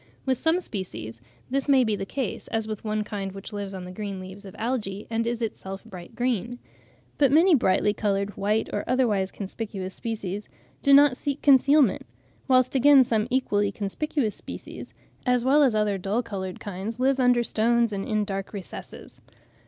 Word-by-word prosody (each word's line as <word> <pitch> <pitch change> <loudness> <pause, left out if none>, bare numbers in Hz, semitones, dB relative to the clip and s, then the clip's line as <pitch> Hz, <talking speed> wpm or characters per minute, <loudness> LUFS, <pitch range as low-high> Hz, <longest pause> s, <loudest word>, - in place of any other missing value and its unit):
With 260 -2 +1
some 325 +2 +2
species 115 - -6 0.3
this 275 +1 -1
may 270 -2 +6
be 220 -3 0
the 195 - -5
case, 260 -3 -4
as 225 -1 -2
with 215 -2 -5
one 215 -1 -1
kind 195 -2 -5
which 195 +1 -9
lives 200 -1 -5
on 185 -1 -6
the 180 - -8
green 200 0 -5
leaves 190 +2 -10
of 190 - -10
algae, 215 -4 -3
and 230 0 0
is 235 0 -2
itself 195 -3 -5
bright 185 -1 -11
green. 245 -1 -1 0.6
But 280 -3 +5
many 335 +5 +6
brightly 210 -5 +3
coloured, 200 -1 -1
white, 210 +2 0
or 205 - -1
otherwise 215 -7 +1
conspicuous 195 -2 -6
species, 210 -3 -5 0.3
do 280 - +3
not 280 -2 +7
seek 285 0 -3
concealment; 280 -4 +4 0.4
whilst 255 -1 +3
again 275 0 +7
some 225 -3 0
equally 205 -6 +1
conspicuous 220 +4 -2
species, - - -9 0.4
as 250 -1 +2
well 285 +3 +5
as 260 -6 +4
other 210 -2 +1
dull 205 +6 -1
coloured 190 -5 -5
kinds 205 +4 -6
live 265 +1 +2
under 245 -1 +4
stones 235 0 +2
and 195 -1 -2
in 215 -1 0
dark 195 0 -5
recesses. 195 -3 -9
215 Hz, 175 wpm, -26 LUFS, 195-255 Hz, 0.6 s, not